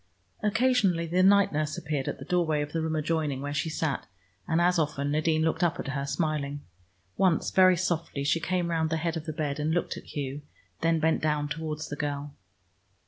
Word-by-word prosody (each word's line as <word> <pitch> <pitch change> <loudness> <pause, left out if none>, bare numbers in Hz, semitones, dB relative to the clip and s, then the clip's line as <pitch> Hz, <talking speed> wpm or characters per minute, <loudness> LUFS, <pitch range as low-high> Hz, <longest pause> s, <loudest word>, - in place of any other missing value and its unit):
Occasionally 215 -6 +2
the 175 +3 +1
night 200 0 +5
nurse 155 0 -1
appeared 145 -3 -3
at - - -2
the - - -9
doorway 165 -5 +1
of 145 - -7
the 165 - -1
room 160 0 -1
adjoining, 155 -3 -1
where 145 +1 -4
she 160 +3 -1
sat, 155 -6 -2 0.4
and 160 - +2
as 175 0 +3
often 145 -2 -1
Nadine 155 +1 +2
looked 160 +1 0
up 170 -3 +1
at - - -4
her 140 0 -2
smiling. 145 -1 -1 0.6
Once, 185 -4 +2
very 185 -1 +6
softly, 165 -5 -1
she 150 +4 +2
came 175 +1 -1
round 160 -1 +1
the 160 - 0
head 165 +1 -1
of 160 -1 -5
the - - -1
bed, 150 -2 -3
and 155 +2 0
looked 175 - -1
at - - -10
Hugh, 140 0 -3 0.4
then 165 0 +2
bent 160 +1 +2
down 150 -1 0
towards 155 0 -4
the 145 - -4
girl. 145 -1 -3
160 Hz, 205 wpm, -28 LUFS, 145-170 Hz, 0.6 s, very